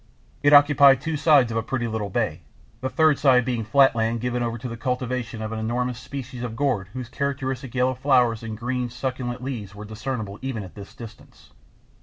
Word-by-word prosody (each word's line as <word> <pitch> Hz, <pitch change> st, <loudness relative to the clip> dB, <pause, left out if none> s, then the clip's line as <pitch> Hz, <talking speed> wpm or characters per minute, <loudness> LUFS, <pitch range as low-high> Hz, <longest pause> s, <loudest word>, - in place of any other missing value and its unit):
It 145 Hz, -, +4 dB
occupied 145 Hz, -2 st, +7 dB
two 160 Hz, +3 st, -3 dB
sides 145 Hz, -5 st, +4 dB
of 115 Hz, -, -2 dB
a -, -, -1 dB
pretty 120 Hz, +1 st, -2 dB
little 110 Hz, -2 st, -3 dB
bay, -, -, -2 dB, 0.4 s
the 130 Hz, -, -2 dB
third 155 Hz, 0 st, +3 dB
side 125 Hz, -4 st, +4 dB
being 120 Hz, -3 st, -1 dB
flat 135 Hz, +4 st, +4 dB
land 115 Hz, +1 st, 0 dB
given 125 Hz, +1 st, -2 dB
over 120 Hz, -1 st, -2 dB
to 125 Hz, +2 st, -6 dB
the 115 Hz, -, -6 dB
cultivation 125 Hz, -2 st, -3 dB
of 110 Hz, -, -4 dB
an 110 Hz, -, -3 dB
enormous 120 Hz, +2 st, -2 dB
species 130 Hz, -1 st, -7 dB
of 120 Hz, -2 st, -4 dB
gourd 125 Hz, -8 st, 0 dB
whose 130 Hz, -2 st, -5 dB
characteristic 135 Hz, -1 st, -3 dB
yellow 130 Hz, 0 st, +2 dB
flowers 125 Hz, -4 st, +2 dB
and 110 Hz, -1 st, -6 dB
green, 125 Hz, +1 st, -2 dB
succulent 125 Hz, 0 st, -4 dB
leaves 110 Hz, -7 st, -5 dB
were 105 Hz, +1 st, -8 dB
discernible 110 Hz, -1 st, -5 dB
even 130 Hz, -5 st, -4 dB
at 90 Hz, -, -11 dB
this 100 Hz, -1 st, -11 dB
distance. 115 Hz, -4 st, -13 dB
125 Hz, 200 wpm, -24 LUFS, 115-135 Hz, 0.4 s, occupied